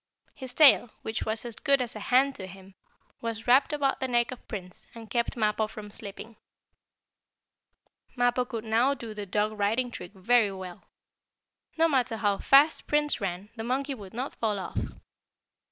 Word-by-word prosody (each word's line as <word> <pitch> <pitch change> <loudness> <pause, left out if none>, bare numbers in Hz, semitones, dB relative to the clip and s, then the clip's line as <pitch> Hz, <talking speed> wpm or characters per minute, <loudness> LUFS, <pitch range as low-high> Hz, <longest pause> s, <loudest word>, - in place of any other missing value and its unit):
His 260 -1 -9
tail, 280 -5 +7
which 220 - -3
was 220 +2 -1
as 235 -2 -5
good 280 -3 +2
as 245 -3 -3
a - - -5
hand 265 +5 +3
to 190 -7 -7
him, 190 +1 -13 0.5
was 230 -1 -4
wrapped 260 +5 +5
about 285 -2 0
the 260 - -1
neck 240 -1 +1
of 255 - -10
Prince, 180 -4 -7
and 225 -2 -11
kept 235 0 -1
Mappo 215 -1 +1
from 210 -1 -10
slipping. 215 +2 -9 1.8
Mappo 245 0 +2
could 230 -3 -5
now 235 +5 +2
do 230 -4 -8
the 205 -1 -6
dog 210 +3 0
riding 230 +5 +1
trick 180 -4 -9
very 215 +2 +3
well. 185 -2 -8 0.9
No 325 +1 +5
matter 255 -6 +1
how 205 -2 +1
fast 285 +3 +5
Prince 295 -4 +1
ran, 195 +2 -4
the 225 - -5
monkey 270 +4 -1
would 205 -5 -11
not 255 +3 -3
fall 215 -3 -1
off. 190 - -4
230 Hz, 170 wpm, -28 LUFS, 210-255 Hz, 1.8 s, tail